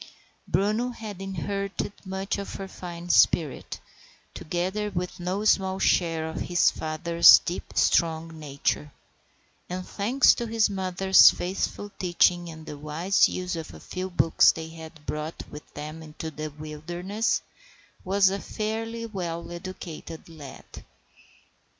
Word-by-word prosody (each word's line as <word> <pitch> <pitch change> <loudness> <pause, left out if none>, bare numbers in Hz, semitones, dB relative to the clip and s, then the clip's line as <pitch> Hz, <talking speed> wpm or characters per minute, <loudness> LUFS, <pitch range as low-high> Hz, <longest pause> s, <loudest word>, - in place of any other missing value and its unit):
Bruno 215 +5 +1
had 215 -5 -8
inherited 195 +2 -3
much 190 +1 -3
of 200 - -6
her 195 - -6
fine 175 -2 -8
spirit, 155 -4 +2 0.5
together 185 +6 -2
with 180 -2 -4
no 185 +4 -2
small 190 -2 +3
share 165 -4 +1
of 160 - -5
his 175 0 +3
father's 165 +2 +6
deep, 175 - -5
strong 165 -1 +1
nature; 145 0 -2 0.8
and, 180 +1 -5
thanks 240 +7 +4
to 235 - -4
his 225 -2 +2
mother's 190 0 +6
faithful 195 +2 -3
teaching 175 -1 +2
and 160 -1 -10
the 145 - -8
wise 160 +6 +2
use 180 0 -3
of 160 -1 -5
the - - -12
few 185 +1 -5
books 170 -2 +5
they 160 0 -7
had 160 -1 -12
brought 155 +2 -4
with 150 - -11
them 155 +2 -7
into 160 +1 -7
the 155 0 -5
wilderness, 175 +8 -3 0.6
was 190 0 +3
a 195 - -2
fairly 225 +2 -4
well 175 -6 -5
educated 175 -2 -8
lad. 150 -5 -11
175 Hz, 130 wpm, -26 LUFS, 160-195 Hz, 0.8 s, father's